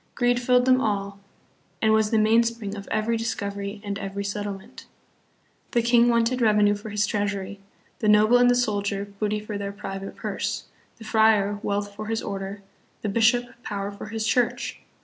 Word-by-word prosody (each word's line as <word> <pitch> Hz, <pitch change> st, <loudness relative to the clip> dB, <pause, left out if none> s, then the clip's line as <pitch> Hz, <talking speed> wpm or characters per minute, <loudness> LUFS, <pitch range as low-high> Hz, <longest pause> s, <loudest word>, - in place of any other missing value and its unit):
Greed 245 Hz, -1 st, +2 dB
filled 250 Hz, 0 st, +3 dB
them 255 Hz, 0 st, +4 dB
all, 200 Hz, -3 st, -2 dB, 0.6 s
and 220 Hz, -1 st, +3 dB
was 220 Hz, -1 st, +3 dB
the 225 Hz, -, +2 dB
mainspring 225 Hz, -1 st, +2 dB
of 200 Hz, -1 st, -8 dB
every 230 Hz, +2 st, 0 dB
discovery 200 Hz, -2 st, -4 dB
and 200 Hz, -1 st, -4 dB
every 200 Hz, 0 st, -4 dB
settlement. 200 Hz, -1 st, -6 dB, 0.9 s
The 235 Hz, -, +3 dB
king 235 Hz, 0 st, +5 dB
wanted 235 Hz, +2 st, +2 dB
revenue 210 Hz, -2 st, +4 dB
for 205 Hz, +1 st, -7 dB
his 210 Hz, 0 st, +1 dB
treasury; 205 Hz, -1 st, -2 dB, 0.4 s
the 215 Hz, -, +1 dB
noble 215 Hz, +3 st, +6 dB
and 245 Hz, 0 st, +5 dB
the 245 Hz, -, +4 dB
soldier, 205 Hz, -4 st, -1 dB
booty 210 Hz, 0 st, 0 dB
for 210 Hz, -1 st, -6 dB
their 200 Hz, 0 st, -3 dB
private 195 Hz, -1 st, -7 dB
purse; -, -, -3 dB, 0.3 s
the 225 Hz, -, -12 dB
friar, 215 Hz, -2 st, +3 dB
wealth 205 Hz, -1 st, -2 dB
for 215 Hz, +1 st, -7 dB
his 225 Hz, 0 st, -2 dB
order; 200 Hz, 0 st, -5 dB, 0.4 s
the 210 Hz, -, -1 dB
bishop, 235 Hz, +3 st, +3 dB, 0.2 s
power 200 Hz, -2 st, -4 dB
for 200 Hz, +1 st, -9 dB
his 220 Hz, 0 st, -3 dB
church. 245 Hz, +1 st, 0 dB
210 Hz, 170 wpm, -25 LUFS, 200-230 Hz, 0.9 s, noble